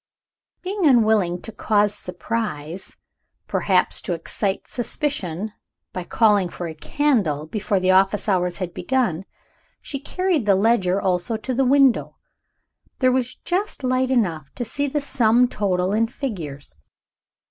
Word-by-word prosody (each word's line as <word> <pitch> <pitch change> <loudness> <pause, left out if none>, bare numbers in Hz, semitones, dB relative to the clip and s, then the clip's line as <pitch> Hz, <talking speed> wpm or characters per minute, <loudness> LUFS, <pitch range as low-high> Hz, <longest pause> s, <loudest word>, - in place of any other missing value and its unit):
Being 375 -2 0
unwilling 215 -8 +3
to 225 - -6
cause 210 -1 +1
surprise, 180 -4 -5 0.5
perhaps - - +1
to 180 - -2
excite 190 +4 -2
suspicion, 220 - -3 0.4
by 180 -1 -4
calling 205 -5 +3
for 175 0 -6
a 160 - -6
candle 185 - 0
before 205 +3 -1
the 185 0 +3
office 195 +3 +3
hours 180 -3 +1
had 180 -3 -4
begun, 195 -4 -1 0.5
she 275 - -6
carried 340 - -1
the 200 - +5
ledger 195 -2 +2
also 185 +4 0
to 255 +4 -4
the 265 +2 +2
window. 270 -1 +3 0.8
There 255 -1 +3
was 255 0 -1
just 370 -4 -3
light 255 0 +1
enough 170 - 0
to 245 - -3
see 285 +6 -2
the 295 +2 -1
sum 245 -3 +3
total 190 -4 0
in 225 +2 +2
figures. 165 - -6
210 Hz, 135 wpm, -22 LUFS, 180-255 Hz, 0.8 s, the